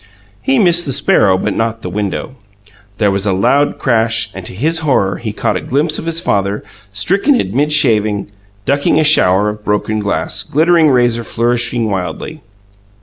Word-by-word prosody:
He 270 0 +1
missed 175 -6 +3
the 135 - -2
sparrow, 95 -5 +2
but - - -2
not 115 0 -2
the - - -4
window. 105 - -4 0.6
There 105 -3 +2
was 100 +1 -2
a 95 - +1
loud 140 +10 +1
crash, 115 -3 0
and 95 - -8
to - - -9
his 160 - 0
horror 100 - 0
he 115 -2 -5
caught 105 - -1
a - - -5
glimpse 150 +4 0
of 165 - -7
his 165 0 +1
father, 100 - -1 0.3
stricken 195 - +1
in 95 - -3
mid 145 +3 +1
shaving, 110 -8 +2 0.4
ducking 140 +2 +1
a - - +3
shower 100 -9 +4
of 105 0 -7
broken 105 +1 -1
glass, 105 0 -2
glittering 160 - +2
razor 120 -3 +2
flourishing 120 0 -1
wildly. 105 - -5
115 Hz, 175 wpm, -14 LUFS, 105-150 Hz, 0.6 s, shower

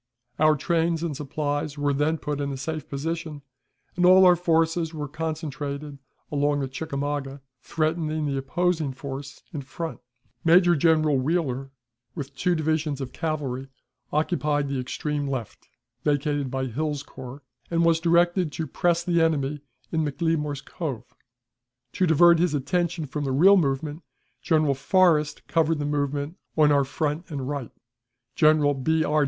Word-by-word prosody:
Our 155 0 +5
trains 165 +2 0
and 160 -4 -2
supplies 145 +1 -3
were 145 0 +1
then 150 +3 +1
put 150 -2 -3
in 140 0 -2
a 135 - -4
safe 155 +3 -5
position, 155 +1 -4 0.5
and 180 - 0
all 185 +1 +8
our 180 -1 +7
forces 165 -1 +1
were 150 -1 -4
concentrated 150 -2 -5 0.3
along 145 0 +1
the 135 - -1
Chickamauga, 140 0 -4 0.2
threatening 155 0 -1
the 140 -1 -1
opposing 160 +1 0
force 140 +1 -8
in 150 - -3
front. 160 +5 -6 0.4
Major 175 +1 +5
General 155 -2 +3
Wheeler, 135 -3 -1 0.5
with 140 -4 -6
two 180 +4 +1
divisions 155 -2 -1
of 130 -2 -6
cavalry, 140 -5 -3 0.4
occupied 150 -2 0
the 135 -1 -2
extreme 145 +3 -3
left, 130 -6 -5 0.4
vacated 145 -1 0
by 130 0 -2
Hill's 145 +3 -2
corps, 130 0 -10 0.3
and 170 0 +2
was 165 -1 +4
directed 175 0 +2
to 160 - -3
press 170 +4 +1
the 170 -1 +2
enemy 150 -3 0 0.3
in 160 -1 +1
McLemore's 150 -1 -1
Cove; 140 -10 -6 0.8
to 185 - +1
divert 170 +1 +6
his 170 -3 +2
attention 165 +3 -1
from 145 +2 -4
the 135 - -1
real 180 +10 +6
movement, 150 -1 0 0.4
General 155 -3 +2
Forrest 150 +1 +2
covered 165 -1 +2
the 145 - -2
movement 145 +2 -2 0.2
on 150 -1 +5
our 140 -1 +3
front 150 +4 -3
and 140 -4 -4
right; 140 -5 -4 0.7
General 155 -2 +4
B. 160 +4 +1
R. 150 +1 +2
150 Hz, 150 wpm, -25 LUFS, 140-165 Hz, 0.8 s, all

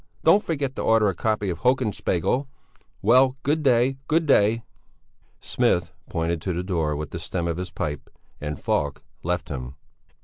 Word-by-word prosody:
Don't 180 +6 +6
forget 140 -5 -2
to - - -1
order 110 -2 +4
a - - -1
copy 105 -1 -1
of 85 - -5
Hoken 125 -3 +2
Spegel! 95 - 0 0.6
Well, 130 +4 +5
good 150 +3 +1
day, 130 -1 +3
good 160 +1 +2
day." 115 -4 +3 0.8
Smith - - +1 0.2
pointed 85 0 -1
to 90 +1 -2
the 90 +2 -2
door 80 -5 0
with 75 -1 -5
the - - -5
stem 85 -2 -3
of 85 0 -2
his 90 0 -4
pipe 75 -4 -4 0.3
and 75 -1 -4
Falk 70 -1 -1 0.2
left 90 0 -2
him. 65 -2 -6
100 Hz, 170 wpm, -24 LUFS, 85-130 Hz, 0.8 s, Don't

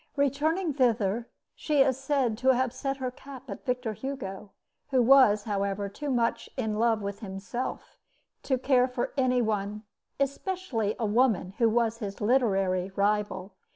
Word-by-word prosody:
Returning 300 +5 +1
thither, 235 -4 +1 0.2
she 300 -3 +1
is 265 -1 +1
said 270 -3 0
to 260 0 +4
have 255 -1 0
set 270 +1 -3
her 255 -2 -3
cap 270 0 -11
at - - -7
Victor 250 -3 -1
Hugo, 210 -6 -6 0.4
who 265 -2 +2
was, 240 -4 +6
however, 200 -1 -2
too 290 +9 -6
much 240 -3 0
in 220 -4 -1
love 225 -2 +2
with 200 0 -4
himself 205 +4 -6 0.4
to 265 - 0
care 255 -1 +3
for 250 -1 -3
any 255 -3 +2
one, 210 -1 -2 0.4
especially 275 - -1
a 230 - -1
woman 210 -4 +2
who 230 -2 +5
was 230 0 +1
his 200 -2 -5
literary 195 -6 +2
rival. 200 -2 0
240 Hz, 155 wpm, -28 LUFS, 205-265 Hz, 0.4 s, was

